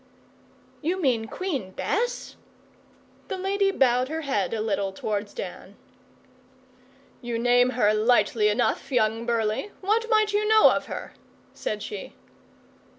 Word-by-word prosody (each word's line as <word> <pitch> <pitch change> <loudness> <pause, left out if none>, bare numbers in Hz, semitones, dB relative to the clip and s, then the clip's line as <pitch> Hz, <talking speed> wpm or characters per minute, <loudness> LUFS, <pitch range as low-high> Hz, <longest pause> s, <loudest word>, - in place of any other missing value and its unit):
'You 345 +5 -1
mean 250 -9 +1
Queen 270 - -4
Bess?' 485 - -2 0.9
The 385 - -4
lady 390 +1 +1
bowed 255 -7 +2
her 320 +1 -3
head 235 - -1
a 225 - -2
little 200 -2 -1
towards 205 +1 -3
Dan. - - -8 1.5
'You 240 -2 -3
name 245 +1 +4
her 210 -3 +4
lightly 215 -1 +3
enough, 240 +5 0
young 225 -1 +1
Burleigh. 225 - 0
What 440 +4 +1
might 430 -2 +3
you 420 +1 +1
know 435 0 +7
of - - -2
her?' - - -7 0.4
said 210 -1 -4
she. 205 -3 -7
245 Hz, 130 wpm, -25 LUFS, -, 1.5 s, know